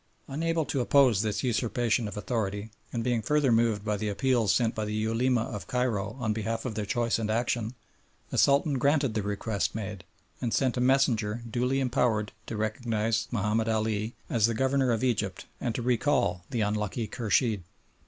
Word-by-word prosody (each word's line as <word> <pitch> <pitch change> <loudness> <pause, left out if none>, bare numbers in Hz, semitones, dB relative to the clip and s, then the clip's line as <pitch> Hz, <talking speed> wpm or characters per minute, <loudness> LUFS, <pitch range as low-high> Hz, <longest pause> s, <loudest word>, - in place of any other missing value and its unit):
Unable 165 +3 -1
to 135 - -1
oppose 125 -5 +4
this 105 -2 -1
usurpation 120 -1 +1
of 105 - -7
authority, 105 -1 -2 0.2
and 115 -2 -2
being 120 -2 +1
further 145 +2 +2
moved 115 -3 +2
by 105 -1 0
the 105 +1 -2
appeals 120 -1 +2
sent 115 -2 +2
by 110 - -3
the 105 0 -3
Ulema 115 +3 +1
of 105 -3 -6
Cairo 125 -4 -1
on 110 -3 0
behalf 115 +1 -3
of 125 - -2
their 105 -1 -3
choice 120 -1 +1
and 110 -1 -2
action, 115 +1 -1 0.6
the - - -2
Sultan 140 0 +3
granted 140 -3 +2
the 110 - 0
request 100 -1 -2
made, 105 -4 -5 0.4
and 120 -3 0
sent 130 -3 +1
a 125 - 0
messenger 120 -4 +2
duly 125 +4 0
empowered 120 -5 +1 0.2
to 110 - -4
recognise 110 0 -1
Mahomed 110 +1 0
Ali 110 0 -1
as 115 -2 +3
the 115 - -1
Governor 130 +1 +2
of 115 +1 0
Egypt 105 -7 -1
and 120 -3 -2
to 120 - -2
recall 120 -8 +1
the 115 - -1
unlucky 105 +2 -1
Khurshid. 110 -1 +1
115 Hz, 180 wpm, -28 LUFS, 105-125 Hz, 0.6 s, oppose